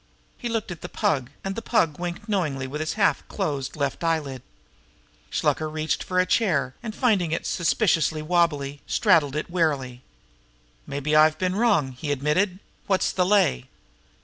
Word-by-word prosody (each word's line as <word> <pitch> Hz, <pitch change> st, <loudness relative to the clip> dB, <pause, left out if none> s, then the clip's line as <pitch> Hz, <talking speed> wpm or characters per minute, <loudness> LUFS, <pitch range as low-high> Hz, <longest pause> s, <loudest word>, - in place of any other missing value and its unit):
He 240 Hz, -, -5 dB
looked 225 Hz, -4 st, -2 dB
at 170 Hz, -, -8 dB
the -, -, -7 dB
Pug, 130 Hz, -5 st, 0 dB
and 195 Hz, -, -2 dB
the 230 Hz, -, -4 dB
Pug 170 Hz, -10 st, +1 dB
winked 175 Hz, +3 st, -5 dB
knowingly 155 Hz, -11 st, -1 dB
with 145 Hz, +4 st, -5 dB
his 155 Hz, -, -2 dB
half 210 Hz, -2 st, +2 dB
closed 145 Hz, -9 st, -3 dB
left 140 Hz, +1 st, -2 dB
eyelid. 150 Hz, -6 st, -1 dB, 0.9 s
Shluker 155 Hz, 0 st, 0 dB
reached 155 Hz, 0 st, -1 dB
out -, -, -7 dB
for 185 Hz, 0 st, +1 dB
a 185 Hz, -, +4 dB
chair, 155 Hz, -, +1 dB
and, 220 Hz, -2 st, -6 dB
finding 205 Hz, -, +2 dB
it 165 Hz, -, -2 dB
suspiciously 165 Hz, -4 st, +1 dB
wobbly, 150 Hz, -4 st, +1 dB
straddled 160 Hz, -9 st, +3 dB
it 155 Hz, +3 st, -3 dB
warily. 140 Hz, -8 st, 0 dB, 0.9 s
"Mabbe 145 Hz, +2 st, -2 dB
I've 155 Hz, 0 st, +5 dB
been 185 Hz, +1 st, 0 dB
in 200 Hz, -, -2 dB
wrong," 200 Hz, -, +3 dB
he 145 Hz, +4 st, -4 dB
admitted. 150 Hz, +7 st, +1 dB, 0.3 s
"What's 190 Hz, -2 st, +2 dB
the 180 Hz, -1 st, +1 dB
lay?" 190 Hz, -, +2 dB
160 Hz, 170 wpm, -25 LUFS, 145-185 Hz, 0.9 s, I've